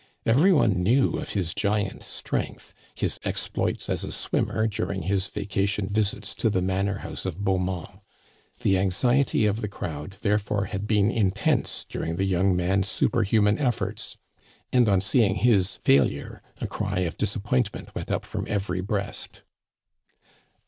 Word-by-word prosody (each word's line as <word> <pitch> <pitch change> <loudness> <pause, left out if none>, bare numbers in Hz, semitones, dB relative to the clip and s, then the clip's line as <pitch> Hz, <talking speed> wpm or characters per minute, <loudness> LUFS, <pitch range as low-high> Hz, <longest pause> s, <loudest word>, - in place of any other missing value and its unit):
Every 145 +12 +5
one 110 - +3
knew 125 +9 +3
of - - -5
his 90 -5 -1
giant 105 -1 -1
strength, - - -4 0.2
his - - -1
exploits - - -2
as - - -1
a - - -4
swimmer 110 - 0
during 100 -3 -2
his 95 +2 0
vaca 100 -1 -1
tion 100 0 -1
visits 105 0 -1
to 115 - +3
the 95 - +1
manor 95 +2 0
house - - -5
of 95 +2 -4
Beaumont. 95 0 -1 0.6
The 95 - +3
anxi 100 +8 +2
ety 130 -5 +2
of 105 +2 +1
the 105 - -2
crowd, 85 -1 -6
therefore, 105 -1 +1
had 100 +2 -4
been 105 0 +3
intense 100 -4 +1
during 80 - -3
the 95 +3 0
young 95 0 +2
man's 95 +2 +1
superhuman 105 -2 +2
efforts, 110 -7 -2 0.6
and, 125 -3 +5
on 95 -2 +3
seeing 100 -1 +3
his 100 -5 +3
fail 70 0 +4
ure, - - -8 0.2
a - - -3
cry 90 - -2
of 85 -3 -2
disappointment 105 +2 -1
went - - -5
up - - -1
from - - -4
every 95 -3 -1
breast. 100 +1 -4
100 Hz, 155 wpm, -26 LUFS, 95-110 Hz, 0.6 s, Every